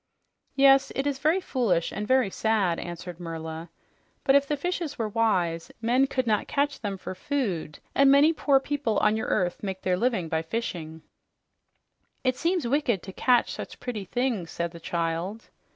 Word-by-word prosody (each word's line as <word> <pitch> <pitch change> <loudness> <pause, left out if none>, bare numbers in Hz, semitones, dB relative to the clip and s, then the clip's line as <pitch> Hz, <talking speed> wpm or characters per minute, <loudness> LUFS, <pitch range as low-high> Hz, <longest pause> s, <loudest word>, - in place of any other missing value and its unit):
"Yes, 275 0 +5
it 270 - -1
is 280 -2 -1
very 310 +6 +3
foolish 230 - 0
and 210 +1 -4
very 255 -5 +3
sad," 205 -7 +1
answered 175 0 -7
Merla. 165 -1 -6 0.5
"But 270 - +4
if 280 0 +4
the 295 - -1
fish 355 +4 -2 0.2
were 225 - -1
wise, 185 -7 0
men 245 +4 +3
could 255 -1 -1
not 215 -2 +1
catch 285 -1 0
them 200 -3 -3
for 185 - -6
food, 185 - -2 0.2
and 275 0 +5
many 285 +4 +6
poor 280 -3 +3
people 270 -6 -1
on 210 0 +3
your 220 - -2
earth 180 -3 0
make 190 -2 -5
their 180 -1 +1
living 225 -6 0
by 160 0 0
fishing." 165 -6 -5 1.2
"It 255 -1 +2
seems 340 +2 0
wicked 245 - +1
to 190 - -8
catch 245 +3 +3
such - - -7
pretty 225 -6 -5
things," 230 -5 -1
said 170 0 -3
the 170 - -10
child. 170 +5 -3
220 Hz, 175 wpm, -27 LUFS, 175-270 Hz, 1.2 s, many